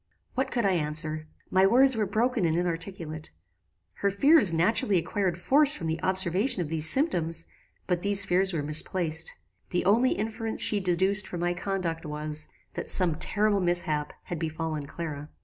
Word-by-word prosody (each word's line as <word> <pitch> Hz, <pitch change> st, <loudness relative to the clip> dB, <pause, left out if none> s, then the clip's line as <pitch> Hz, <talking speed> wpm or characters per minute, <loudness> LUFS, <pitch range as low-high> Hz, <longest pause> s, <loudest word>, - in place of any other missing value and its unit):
"What 265 Hz, +1 st, -2 dB
could 235 Hz, -3 st, -1 dB
I 195 Hz, -, +3 dB
answer? 155 Hz, -1 st, -1 dB, 0.2 s
My 190 Hz, +1 st, +4 dB
words 260 Hz, +4 st, +4 dB
were 215 Hz, -2 st, -1 dB
broken 225 Hz, +2 st, 0 dB
and 165 Hz, -1 st, +1 dB
inarticulate. 165 Hz, -2 st, -4 dB, 0.7 s
Her 200 Hz, -, 0 dB
fears 240 Hz, -, +5 dB
naturally 185 Hz, +4 st, +2 dB
acquired 175 Hz, +1 st, -2 dB
force 285 Hz, +10 st, +4 dB
from 165 Hz, -, -6 dB
the 160 Hz, +1 st, -3 dB
observation 190 Hz, +5 st, +1 dB
of 150 Hz, -, -8 dB
these 160 Hz, 0 st, +1 dB
symptoms; 165 Hz, -, +1 dB, 0.4 s
but 180 Hz, -2 st, -1 dB
these 200 Hz, 0 st, +3 dB
fears 190 Hz, +1 st, +1 dB
were 160 Hz, -5 st, -3 dB
misplaced. 160 Hz, +2 st, +1 dB, 0.3 s
The 180 Hz, -, -2 dB
only 235 Hz, +6 st, +3 dB
inference 220 Hz, +1 st, -3 dB
she 210 Hz, -, +2 dB
deduced 190 Hz, +2 st, +1 dB
from 175 Hz, -, -6 dB
my 175 Hz, 0 st, 0 dB
conduct 180 Hz, -3 st, -4 dB
was, 150 Hz, 0 st, -2 dB, 0.3 s
that -, -, -5 dB
some 170 Hz, -4 st, +2 dB
terrible 210 Hz, -1 st, +1 dB
mishap 160 Hz, -4 st, -1 dB
had 175 Hz, -, -6 dB
befallen 160 Hz, -2 st, -4 dB
Clara. 150 Hz, -2 st, -7 dB
175 Hz, 165 wpm, -26 LUFS, 160-200 Hz, 0.7 s, fears